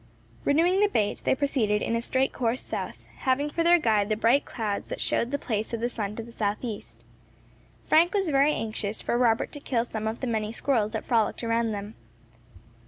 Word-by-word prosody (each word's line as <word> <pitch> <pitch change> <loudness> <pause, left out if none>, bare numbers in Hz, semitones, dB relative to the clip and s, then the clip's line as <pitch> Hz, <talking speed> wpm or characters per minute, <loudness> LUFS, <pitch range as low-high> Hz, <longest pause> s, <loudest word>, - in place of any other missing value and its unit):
Renewing 340 +6 +3
the 415 - +5
bait, 210 - 0
they - - +3
proceeded 235 -7 +1
in 230 - 0
a 230 - 0
straight 260 +2 0
course 240 0 -1
south, - - -5
having 280 +2 0
for 335 - -1
their 345 +1 +6
guide 215 -8 +2
the 215 - +2
bright 230 +6 +3
clouds 210 -4 -3
that - - -5
showed 235 - +1
the 285 - -1
place 220 -4 -3
of - - -5
the 235 - 0
sun 210 -4 -4
to 230 - -5
the 235 - -12
south 210 -2 -1
east. 120 - -7 0.8
Frank 335 +3 +4
was 390 -4 0
very 280 +1 +4
anxious 215 -4 -3
for - - -1
Robert 235 -2 +2
to 290 - -7
kill 240 -4 -1
some 220 -2 -4
of 220 +1 -3
the - - -3
many 220 -3 -1
squirrels 230 -3 0
that 220 - -3
frolicked 230 -1 +1
around 230 0 +1
them. 205 +1 -5
230 Hz, 210 wpm, -27 LUFS, 215-275 Hz, 0.8 s, their